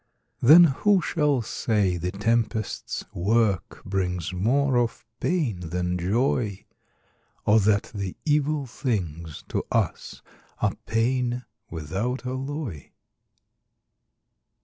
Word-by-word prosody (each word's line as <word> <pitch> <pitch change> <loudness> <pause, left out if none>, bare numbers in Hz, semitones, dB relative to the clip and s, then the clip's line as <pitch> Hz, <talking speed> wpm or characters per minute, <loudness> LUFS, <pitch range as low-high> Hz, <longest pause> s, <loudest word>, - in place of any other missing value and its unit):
Then 155 +8 +9
who 185 +6 +3
shall 150 -8 +1
say 105 -4 0
the 90 +1 -2
tempest's 110 +1 -1
work 100 -1 0
Brings 90 -2 -2
more 130 +9 +2
of 120 -1 -1
pain 150 - 0
than 90 +1 -1
joy; 105 +2 0 0.8
Or 110 +2 +5
that 105 0 +2
the 100 -4 -4
evil 150 -1 +1
things, 85 - -3
to - - -1
us - - -1 0.4
Are - - +1
pain, 125 +2 0 0.2
without 95 - -3
alloy? 130 - -4
115 Hz, 100 wpm, -25 LUFS, 95-130 Hz, 0.8 s, Then